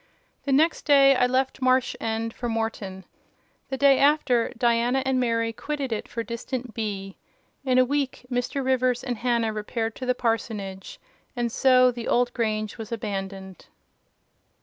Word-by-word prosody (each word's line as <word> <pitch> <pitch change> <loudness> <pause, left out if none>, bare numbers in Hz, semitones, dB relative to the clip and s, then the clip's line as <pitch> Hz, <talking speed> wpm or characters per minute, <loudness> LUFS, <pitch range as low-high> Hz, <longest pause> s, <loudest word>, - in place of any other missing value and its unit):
The 280 - -1
next 310 +5 +2
day 275 -2 +6
I 250 -1 +3
left 260 +1 -1
Marsh 255 -1 +2
End 225 0 -2
for 240 - -4
Morton. 220 -4 -4 0.6
The 265 - -3
day 275 0 +5
after, 280 -5 +3
Diana 240 +2 +2
and 265 -1 +1
Mary 230 -2 0
quitted 280 +1 -4
it 210 - -4
for 230 - -4
distant 235 +1 -5
B——. 195 -3 -4 0.5
In 255 -2 +2
a 255 - +6
week, 275 -1 -2
Mr. 245 +2 -2
Rivers 255 -1 +1
and 245 -3 -3
Hannah 235 -2 0
repaired 225 +1 -3
to 255 - -6
the 250 - +2
parsonage: 215 -5 -3 0.4
and 240 -1 -1
so 255 0 +5
the 235 -1 -6
old 245 0 +2
grange 215 -2 -2
was 220 0 -7
abandoned. 195 -3 -5
240 Hz, 155 wpm, -25 LUFS, 225-260 Hz, 0.6 s, day